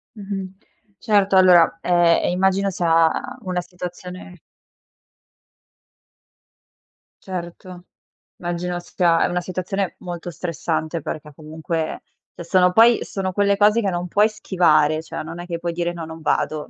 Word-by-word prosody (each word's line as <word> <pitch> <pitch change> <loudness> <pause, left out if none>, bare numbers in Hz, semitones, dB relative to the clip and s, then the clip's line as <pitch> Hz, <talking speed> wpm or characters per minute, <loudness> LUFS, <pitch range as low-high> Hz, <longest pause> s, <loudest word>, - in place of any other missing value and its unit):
Mh-mh. 195 -2 -6 0.5
Certo 200 -2 +2
allora, 175 -3 +5
ehm, 175 -1 +3
e - - +1
immagino 190 +2 +1
sia 165 -2 +3 0.3
una 180 -3 -2
situazione 180 0 -9 2.9
Certo, 180 0 -8 0.5
immagino 175 0 -3
sia 175 -1 +1
è - - +3
una 180 0 -2
situazione 185 +2 -3
molto 175 -1 -7
stressante 165 -1 -3
perché 150 0 -7
comunque 160 +1 -4 0.3
se 170 - -9
sono 180 0 +3
poi 230 +4 +6
sono 190 -1 -4
quelle 200 +1 +2
cose 210 +3 +4
che 200 - 0
non 175 0 -3
puoi 210 +5 +3
schivare, 155 -6 +2
cioè - - -6
non 165 +2 -7
è 175 - -8
che 170 -2 -5
puoi 170 0 -3
dire: 175 0 -2
"No, 170 -2 -7
non 160 0 -10
vado" 155 -1 -1
175 Hz, 135 wpm, -21 LUFS, 170-190 Hz, 2.9 s, poi